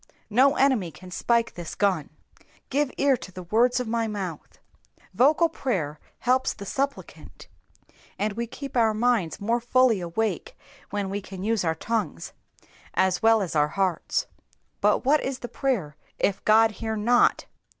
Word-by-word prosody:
No 270 +6 +5
enemy 260 -10 +2
can 180 +2 -13
spike 235 +5 +1
this 175 -2 -7
gun. 185 -8 0 0.6
^^Oive 285 0 +1
ear 280 -1 +4
to 185 - -10
the 185 0 -8
words 240 +7 +2
of 250 - -3
my 230 0 0
mouth,'' 190 -7 -6 0.4
^ - - -27
Vocal 305 +6 +4
prayer 180 - -3 0.2
helps 255 +1 +1
the 200 - -9
supplicant, 275 +7 -5 0.7
and 210 0 -1
we 235 +2 -3
keep 275 +4 -8
our 225 -3 +3
minds 225 -7 +1
more 230 +4 0
fully 240 -4 +3
awake 180 +2 -3 0.3
when 200 -1 -3
we 200 +1 -3
can 190 -1 -8
use 220 -1 0
our 160 -1 0
tongues 225 +6 -3 0.6
as 190 -1 +2
well 225 -1 +4
as 175 - -5
our 150 -1 +4
hearts. 195 - 0 0.5
But - - +2
what 295 +3 +4
is 265 -1 -3
prayer 240 - -2 0.2
if 195 - 0
God 220 +1 +5
hear 220 +1 -4
not 235 +3 +3
220 Hz, 160 wpm, -25 LUFS, 190-250 Hz, 0.7 s, No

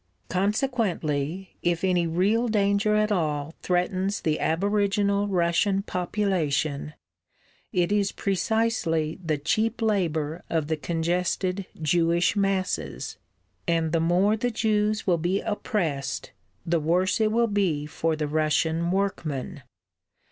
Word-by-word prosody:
Consequently, 190 - -1
if 175 0 0
any 180 -2 +2
real 200 +8 +2
danger 205 0 +2
at 215 0 +2
all 155 -5 -1
threatens 185 +2 0
the 155 -1 0
aboriginal 200 +3 +1
Russian 190 +2 +1
population, 165 -7 -1 0.8
it 180 -2 +1
is 205 -1 +2
precisely 195 -6 0
the 155 -3 0
cheap 220 +11 0
labour 170 -7 0
of 160 -2 -1
the 160 - +2
congested 180 +4 -1
Jewish 170 +3 +2
masses, 190 - -1 0.5
and 165 -2 +1
the 165 - +2
more 180 +6 +3
the 245 +3 -1
Jews 215 -1 0
will 175 -3 +2
be 180 +4 0
oppressed 160 - -2 0.3
the 170 0 +1
worse 180 +7 +1
it 215 -1 +3
will 235 +1 +3
be 190 -9 0
for 160 +1 -1
the 155 -1 -2
Russian 160 +2 +1
workman! 175 -5 -2
180 Hz, 120 wpm, -26 LUFS, 160-205 Hz, 0.8 s, more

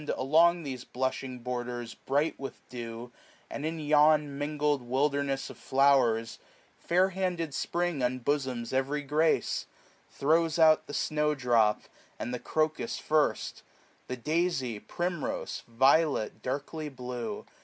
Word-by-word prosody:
Along 165 +5 +4
these 130 -4 -5
blushing 130 0 -3
borders, 120 -1 -4
bright 145 +3 -1
with 135 0 -8
dew. 120 0 -7 0.4
And 150 - -3
in 165 0 -4
yon 150 0 +4
mingFed 145 +1 0
wilderness 135 +2 0
of - - -14
flowers, 130 -5 +2 0.4
525 - - -28
Fair 185 +2 +4
handed 180 -5 -2
Spring 175 -1 -1
unbosoms 125 -1 -1
every 135 +3 0
grace; 155 +3 +1 0.4
Throws 160 +2 +2
out 160 -1 +5
the 145 - -6
snow 150 0 +1
drop, 120 -5 +3 0.4
and 120 - -4
the 125 - -3
crocus 155 - -1
firjt 155 -1 +1
j - - -16 0.5
The 125 - -4
daisy, 150 -5 -1
primrose, 175 - -3
violet 135 +2 +2
darkly 145 +4 -4
blue. 125 -5 -5
140 Hz, 125 wpm, -29 LUFS, 125-155 Hz, 0.5 s, out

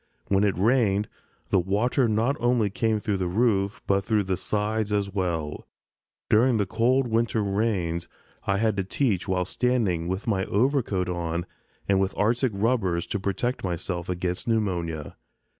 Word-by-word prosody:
When 100 0 +3
it 100 -4 +1
rained 105 -1 +2 0.4
the 95 - +4
water 110 +8 +1
not 115 +5 +1
only 120 -4 +2
came 110 +1 0
through 105 -1 -1
the 90 -1 -1
roof, 100 0 +1
but 100 0 +2
through 105 0 +1
the 95 -1 -1
sides 105 +2 -1
as 100 -2 0
well. 85 -6 -2 0.6
During 120 +2 +4
cold 120 +6 +2
winter 115 -1 +1
rains 95 -5 -1 0.4
I 100 - +2
had 110 0 +1
to 95 - +1
teach 100 -2 0
while 90 -1 0
standing 105 -8 0
with 95 +3 -3
my 95 -4 0
overcoat 110 -5 +1
on 85 -1 -2 0.4
and 100 -1 +3
with 95 0 -1
arctic 115 +4 +2
rubbers 100 -6 +1
to 100 - -3
protect 100 +7 -2
myself 85 -1 -3
against 90 +5 -2
pneumonia. 85 -9 -1
100 Hz, 155 wpm, -26 LUFS, 90-115 Hz, 0.6 s, the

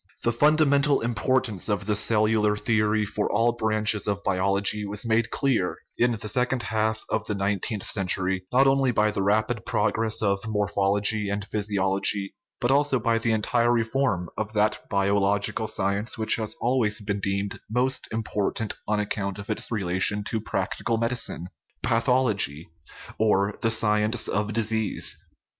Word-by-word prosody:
The 120 - +1
fundamental 145 +1 +3
importance 120 -3 0
of 105 -1 -1
the 105 0 0
cellular 105 0 +2
theory 105 0 +1
for 105 0 -2
all 115 +3 +3
branches 110 -2 0
of 100 -1 -2
biology 100 +2 +1
was 105 +1 -4
made 115 0 +1
clear 115 -11 0 0.2
in 120 0 +2
the 110 -1 -5
second 125 +3 0
half 110 0 -1
of 110 0 -2
the 105 - -2
nineteenth 100 +1 -2
century, 95 -1 -1
not 130 +2 +4
only 135 -1 +3
by 105 -3 +2
the 100 - -2
rapid 110 +3 0
progress 110 0 0
of 100 -1 +1
morphology 105 0 +1
and 100 0 -3
physiology, 100 -1 0 0.3
but 120 - +1
also 140 -1 +2
by 115 0 +1
the 115 0 0
entire 115 +2 +2
reform 115 -5 0
of 110 0 -4
that 105 0 +1
biological 100 +2 +1
science 100 +2 -2
which 110 -1 +2
has 110 -2 -3
always 120 -3 +1
been 100 -1 -3
deemed 100 0 -2
most 125 +3 0
important 110 -1 -2
on 105 0 +1
account 100 -2 -3
of 100 +2 -6
its 110 - -2
relation 100 0 -1
to 110 +1 -3
practical 115 +2 -2
medicine 115 -6 -2 0.4
pathology, 115 - +1 0.5
or 105 -2 +2
the 115 - +2
sci 105 -1 +2
ence 110 +1 +2
of 105 +1 -1
disease. 110 -2 0
105 Hz, 150 wpm, -25 LUFS, 100-115 Hz, 0.5 s, not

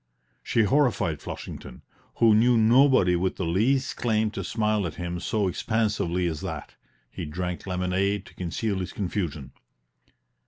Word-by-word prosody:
She 115 - +1
horrified 110 - +1
Flushington, - - -8 0.3
who 115 -2 +5
knew 120 +3 +4
nobody 115 -4 +5
with 90 +2 0
the 95 - -3
least 125 +11 +1
claim 110 -2 +1
to 100 -2 -5
smile 105 -1 0
at 80 - -7
him 85 0 -4
so 105 +2 0
expansively 95 -3 0
as 80 -3 -2
that; - - -6 0.4
he - - -6
drank 90 +4 -4
lemonade 95 +2 0
to - - -15
conceal 95 +3 -2
his 90 - -5
confusion. 85 -8 -3
100 Hz, 145 wpm, -26 LUFS, 90-110 Hz, 0.4 s, who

